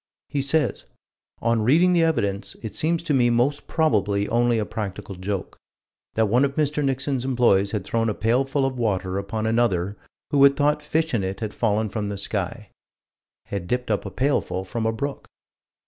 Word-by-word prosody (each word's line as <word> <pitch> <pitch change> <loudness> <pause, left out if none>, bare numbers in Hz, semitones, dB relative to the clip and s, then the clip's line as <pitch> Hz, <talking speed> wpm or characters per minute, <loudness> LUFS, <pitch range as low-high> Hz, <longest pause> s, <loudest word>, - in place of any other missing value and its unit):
He 140 0 -1
says: 145 +3 0 0.6
"On 115 -1 +2
reading 165 +11 +4
the 170 - +4
evidence, 100 -11 -1
it 110 - -5
seems 165 +1 0
to 155 - 0
me 125 -3 +4
most 125 +5 +1
probably 105 -10 +1
only 120 0 +2
a 110 - 0
practical 105 -2 -5
joke: 95 +1 -5 0.6
that 110 - +3
one 120 +6 +3
of 140 0 0
Mr. 150 -1 0
Nixon's 135 -1 -1
employees 120 -7 +3
had 105 -2 -2
thrown 115 +3 0
a 105 - -2
pailful 135 +5 +1
of 130 -2 -3
water 95 -4 0
upon 110 +2 -3
another, 105 -5 +1 0.4
who 145 -2 +3
had 140 0 +7
thought 150 +1 +2
fish 160 +1 -1
in 110 -5 +1
it 95 +1 -3
had 110 -2 -4
fallen 110 -1 +1
from 105 0 -3
the 100 - -4
sky" 100 +2 -4 0.7
had 100 -3 -5
dipped 125 +2 -1
up 105 - 0
a 100 - -5
pailful 125 -3 0
from 110 +3 -2
a - - +2
brook. 140 +5 -4
115 Hz, 185 wpm, -24 LUFS, 100-140 Hz, 0.7 s, had